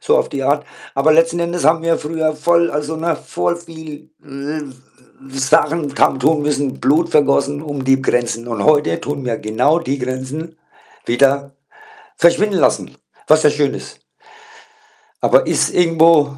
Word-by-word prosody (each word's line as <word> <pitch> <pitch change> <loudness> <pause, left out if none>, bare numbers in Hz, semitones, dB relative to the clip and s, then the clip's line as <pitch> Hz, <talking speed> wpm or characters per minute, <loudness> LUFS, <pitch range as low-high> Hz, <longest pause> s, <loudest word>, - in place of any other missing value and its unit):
so 465 - +2
auf - - 0
die 135 -1 -4
Art. 145 +2 +1 0.3
Aber 145 +3 +3
letzten 165 +2 +2
Endes 170 -2 -2
haben 160 +1 +3
wir 165 0 +1
früher 155 0 -2
voll 170 +2 +2
also, 150 +2 -3
ne, 165 -1 -1
voll 170 - -3
viel, 160 -2 -11
äh, - - -19 0.3
äh, - - -6 0.7
Sachen 145 +3 +1
haben 135 - +2
tun 150 +2 +2
müssen, 145 -2 -2
Blut 150 +6 +2
vergossen 145 0 +2
um 145 -3 -5
die 135 0 +3
Grenzen. 120 -2 -1
Und 115 -4 -3
heute 150 -1 +2
tun 145 -2 -5
wir 115 -2 -2
genau 125 +10 +1
die 140 -3 -3
Grenzen 130 +6 -5 0.5
wieder 140 +2 +1 0.6
verschwinden 190 +3 +2
lassen, - - 0 0.3
was 155 +1 +5
ja 150 - +6
schön 145 -1 0
ist. - - -10 1.2
Aber - - +3
ist - - +1
irgendwo 165 -4 +3
150 Hz, 160 wpm, -17 LUFS, 140-165 Hz, 1.2 s, ja